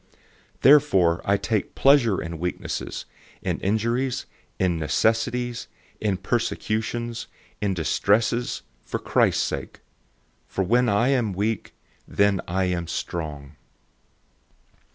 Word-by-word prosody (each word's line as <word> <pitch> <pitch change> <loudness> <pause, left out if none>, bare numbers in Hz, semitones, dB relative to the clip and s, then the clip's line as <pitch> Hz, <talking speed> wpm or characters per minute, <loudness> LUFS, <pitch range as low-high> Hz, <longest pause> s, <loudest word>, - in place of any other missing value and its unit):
012:010 - - -36 0.5
Therefore 100 - +5
I 100 +1 +3
take 110 0 -2
pleasure 135 -8 +4
in 85 -1 -5
weaknesses, 90 +1 -4 0.4
in - - -1
injuries, 115 +6 0 0.3
in 90 -3 +1
necessities, 115 +8 0 0.3
in 100 -3 0
persecutions, 115 +2 -2 0.3
in 100 -2 0
distresses, 105 +8 +1 0.2
for - - -3
Christ's - - +2
sake. - - -5 0.7
For 95 - -1
when 120 +6 +3
I 105 +5 +3
am 120 -7 +1
weak, 105 +3 -2 0.3
then 100 -1 +2
am 90 -1 0
I - - -8
strong. 75 -4 -5
105 Hz, 110 wpm, -24 LUFS, 90-120 Hz, 0.7 s, Therefore